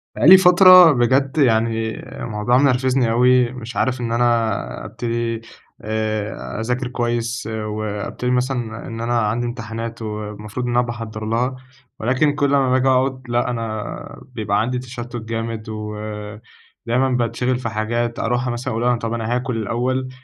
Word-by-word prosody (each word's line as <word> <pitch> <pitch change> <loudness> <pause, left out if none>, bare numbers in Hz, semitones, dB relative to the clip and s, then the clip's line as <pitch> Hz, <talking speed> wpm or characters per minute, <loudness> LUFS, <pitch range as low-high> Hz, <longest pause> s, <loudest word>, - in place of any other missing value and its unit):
بقى - - +2
لي 190 +2 +11
فترة 185 -1 +8
بجد، 135 +3 +1
يعني، 115 -4 +1 0.2
الموضوع 115 +2 +1
منرفزني 130 -2 +2
أوي، 125 +1 +4
مش 125 -1 -8
عارف 130 -1 0
إن 115 -1 -2
أنا 115 -3 0
أبتدي 115 -1 -3 0.4
آآ، 110 0 -3
أذاكر 125 +2 -1
كويس، 120 -1 -2
وأبتدي 110 +2 -3
مثلًا 125 -3 -2
إن 115 0 -6
أنا 120 0 +1
عندي 115 +2 0
امتحانات 115 -1 -6
والمفروض 105 +2 -5
إن 120 - -2
أنا 120 0 +3
باحضَّر 115 -2 -6
لها، 120 +4 0 0.4
ولكن 130 +6 +1
كل 145 -1 +1
ما 135 -2 +3
باجي 130 +1 +2
أقعد، 130 0 +2
لأ 120 +1 +1
أنا 115 -3 -3 0.5
بيبقى 105 -2 0
عندي 125 +3 -1
تشتت 120 -1 -8
جامد، 115 -1 -4
ودايمًا 105 +4 -4
باتشغِل 125 +1 0
في 115 - -3
حاجات، 115 +2 -2
أروح 120 +2 0
مثلًا 120 +1 -3
أقول 120 +2 +1
طب 115 0 -3
أنا 115 +1 -1
هاكل 125 -1 -2
الأول، 125 +4 -1
120 Hz, 145 wpm, -20 LUFS, 110-125 Hz, 0.5 s, لي